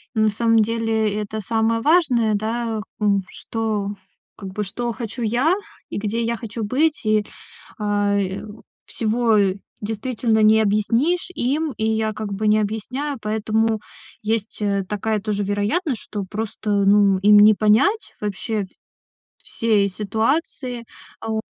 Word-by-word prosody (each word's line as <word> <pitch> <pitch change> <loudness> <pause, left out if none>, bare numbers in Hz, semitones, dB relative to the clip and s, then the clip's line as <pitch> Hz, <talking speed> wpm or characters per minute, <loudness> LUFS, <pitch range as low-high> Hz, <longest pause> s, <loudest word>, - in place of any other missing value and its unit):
на 220 -1 +3
самом 225 +2 +2
деле, 225 -1 0
это 215 +1 -5
самое 225 +2 +1
важное, 265 -9 +3
да, 225 +1 -2
к 215 - -10
у 200 -1 +3
что, 215 -3 -3 0.5
как 195 -2 -7
бы 210 - -2
что 235 +5 -3
хочу 235 0 -6
я 245 +9 +2 0.4
и - - -4
где 220 +3 -1
я 230 0 -1
хочу 225 -1 -5
быть. 290 +5 +1
И, 215 -1 +2 0.5
а, 205 -1 +1
э, 190 0 -2 0.4
всего 225 0 +1 0.4
действительно 220 +1 -1
не 220 +1 +6
объяснишь 230 - +1
им, 285 +4 0
и 220 - -1
я 220 0 0
как 210 -1 -5
бы 210 +2 0
не 215 - +5
объясняю. 245 +7 -3
Поэтому 220 +1 0 0.4
есть, 220 0 -2
э, 200 -2 0
такая 210 +1 -1
тоже 205 -1 -2
вероятность, 215 - -1
что 205 -2 -5
просто, 210 -1 -1
ну, 200 -1 +5
им 205 +2 +6
не 210 +1 +8
понять 225 - +2
вообще 210 +1 -2 0.6
в - - -35
всей 215 -3 +1
ситуации, 235 - -1 0.4
а, 225 - -6
о - - 0
220 Hz, 145 wpm, -22 LUFS, 210-230 Hz, 0.6 s, не